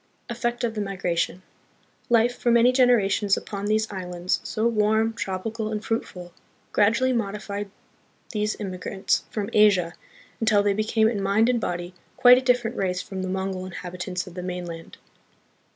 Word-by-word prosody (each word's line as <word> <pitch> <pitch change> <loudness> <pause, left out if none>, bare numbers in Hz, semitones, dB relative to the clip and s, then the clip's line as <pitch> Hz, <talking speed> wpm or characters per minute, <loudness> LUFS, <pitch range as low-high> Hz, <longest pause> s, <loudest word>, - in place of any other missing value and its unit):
Effect 240 0 -2
of 230 -2 0
the 215 - -3
Migration. 185 -2 -2 0.7
Life 235 +1 +3
for 245 - -1
many 235 +1 +5
generations, 220 -6 +3
upon 200 0 -5
these 215 +1 +2
islands, 180 -1 -2
so 220 - -2
warm, 220 0 +2
tropical, 215 +2 -4
and 215 0 -4
fruitful, 180 -6 -4 0.4
gradu 215 +2 +4
ually 260 -1 +2
modified 205 -2 -3 0.6
these 210 -1 -2
emigrants 190 -1 -2
from 205 -2 -4
Asia, 195 -5 +4 0.5
until 215 -2 +3
they 205 -1 +2
be 215 +2 0
came 220 0 +2
in 220 -3 -1
mind 200 +4 +3
and 240 -2 +1
body 175 -1 -3 0.2
quite 250 0 +8
a - - -6
different 250 -2 +1
race 180 -1 -1
from 190 -1 -6
the 185 - -3
Mongol 190 0 -3
inhabitants 180 0 -5
of 180 - -11
the 180 - -6
mainland. 175 -2 -6
205 Hz, 160 wpm, -25 LUFS, 185-225 Hz, 0.7 s, quite